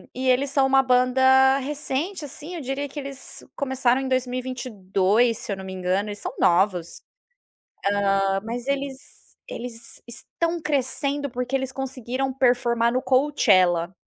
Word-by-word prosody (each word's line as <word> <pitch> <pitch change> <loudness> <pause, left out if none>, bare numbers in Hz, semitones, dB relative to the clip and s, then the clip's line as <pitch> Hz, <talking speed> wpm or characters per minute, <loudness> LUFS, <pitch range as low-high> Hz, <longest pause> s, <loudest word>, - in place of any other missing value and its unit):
e 260 +1 -2
eles 255 +2 +3
são 275 -1 +3
1 270 0 +5
banda 260 +1 +4
recente, 295 +5 -3
assim, 295 +5 -7
eu 335 - -5
diria 275 +2 -3
que 295 - -7
eles 275 -1 -8
começaram 265 -2 +1
em 265 - -3
2022, 245 -4 0
se - - -6
eu 195 - -2
não 190 - -8
me 190 - -7
engano, 185 +3 -1
eles 205 0 -6
são - - -5
novos. 175 -1 +1 1.1
Hã, 195 0 +1
mas 240 +3 -5
eles 275 -1 -4 0.2
eles 235 -1 -7
estão 335 +8 -3
crescendo, 285 0 -1
porque 250 +1 -5
eles 265 -1 -1
conseguiram 265 0 -3
performar 240 -2 +2
no 255 - +1
Coachella 200 - +3
255 Hz, 145 wpm, -24 LUFS, 230-270 Hz, 1.1 s, 1